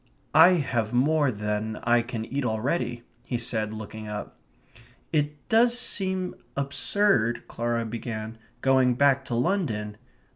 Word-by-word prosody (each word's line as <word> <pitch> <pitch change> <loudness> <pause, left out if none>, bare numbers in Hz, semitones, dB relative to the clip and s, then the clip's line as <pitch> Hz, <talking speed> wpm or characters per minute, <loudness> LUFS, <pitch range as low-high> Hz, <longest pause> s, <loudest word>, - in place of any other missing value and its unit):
"I 165 +4 +8
have 120 -9 -1
more 145 +3 +3
than 105 0 -3
I 120 0 +4
can 115 -1 -5
eat 140 +4 -3
already," 120 +1 -1 0.2
he 120 - -3
said, 110 -2 -1
looking 110 0 -7
up. 105 0 -6 0.8
"It 150 -2 -1
does 235 +2 +4
seem 190 -5 0 0.2
absurd 140 - +1
..." - - -33
Clara 115 0 -2
began, 110 -1 -6 0.2
"going 130 -2 +4
back 140 +1 +3
to 120 - -3
London...." 115 - -1
120 Hz, 135 wpm, -26 LUFS, 110-145 Hz, 0.8 s, I